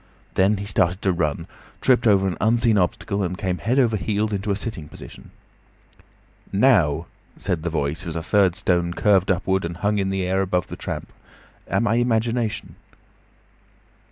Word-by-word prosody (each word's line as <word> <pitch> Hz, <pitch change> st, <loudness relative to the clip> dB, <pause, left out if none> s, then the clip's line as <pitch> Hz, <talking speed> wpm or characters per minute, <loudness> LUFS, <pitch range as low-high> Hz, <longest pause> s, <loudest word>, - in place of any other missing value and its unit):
Then 100 Hz, +3 st, +3 dB
he 100 Hz, -, -5 dB
started 95 Hz, -2 st, +1 dB
to 95 Hz, -, +3 dB
run, 80 Hz, -5 st, -1 dB, 0.3 s
tripped 125 Hz, -2 st, +3 dB
over 95 Hz, -2 st, +4 dB
an 90 Hz, -, -2 dB
unseen 115 Hz, +1 st, +3 dB
obstacle, 100 Hz, +1 st, 0 dB
and 90 Hz, -1 st, -2 dB
came 95 Hz, -3 st, -2 dB
head 125 Hz, +4 st, 0 dB
over 120 Hz, -5 st, +3 dB
heels 105 Hz, +1 st, -1 dB
into 100 Hz, +1 st, -3 dB
a 100 Hz, -, +2 dB
sitting 95 Hz, -7 st, -5 dB
position. -, -, -12 dB, 1.2 s
"Now," 100 Hz, -, +3 dB, 0.3 s
said 90 Hz, -5 st, -2 dB
the 85 Hz, -, -2 dB
Voice, 75 Hz, +1 st, -2 dB
as 80 Hz, -, -4 dB
a 80 Hz, -, -3 dB
third 95 Hz, -1 st, +3 dB
stone 85 Hz, -2 st, 0 dB
curved 100 Hz, -2 st, +3 dB
upward 95 Hz, +1 st, +1 dB
and 85 Hz, 0 st, -4 dB
hung 105 Hz, +3 st, 0 dB
in 95 Hz, -1 st, 0 dB
the 95 Hz, -1 st, -1 dB
air 95 Hz, +1 st, +1 dB
above 90 Hz, -2 st, 0 dB
the -, -, -8 dB
tramp. -, -, -6 dB, 0.5 s
"Am 115 Hz, -, 0 dB
I 110 Hz, +1 st, +2 dB
imagination?" 115 Hz, -2 st, -1 dB
95 Hz, 170 wpm, -23 LUFS, 90-105 Hz, 1.2 s, over